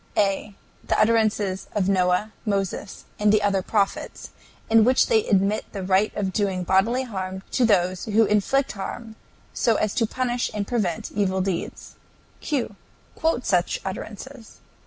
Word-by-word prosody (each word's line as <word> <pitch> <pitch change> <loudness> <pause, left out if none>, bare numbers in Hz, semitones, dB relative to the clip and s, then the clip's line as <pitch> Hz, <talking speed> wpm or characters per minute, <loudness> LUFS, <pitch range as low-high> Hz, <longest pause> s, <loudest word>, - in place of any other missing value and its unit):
A. 200 0 0 0.3
The - - 0
utterances 215 -3 +1
of 195 -3 +1
Noah, 185 +2 +1
Moses, 200 -1 -3
and 210 0 +4
the 215 -1 +3
other 200 -2 +2
prophets, 200 +1 -2 0.4
in 225 0 +5
which 255 +3 +4
they 445 -3 +2
admit 200 +1 +2
the 195 -2 -4
right 190 +3 +2
of 190 -2 -2
doing 190 -3 0
bodily 200 +8 +2
harm 190 -5 -5
to 250 - +2
those 185 -4 +1
who 220 +1 +3
inflict 235 +7 +1
harm, 220 +3 -7 0.4
so 230 - +2
as 215 -1 0
to 230 -3 +1
punish 245 0 -1
and 205 -1 -1
prevent 200 -8 -2
evil 190 -2 0
deeds. 185 -2 -4 0.4
Q. 265 -8 -2 0.4
Quote 320 -7 -1
such 180 -2 +1
utterances. 225 +5 -8
205 Hz, 150 wpm, -24 LUFS, 190-225 Hz, 0.4 s, in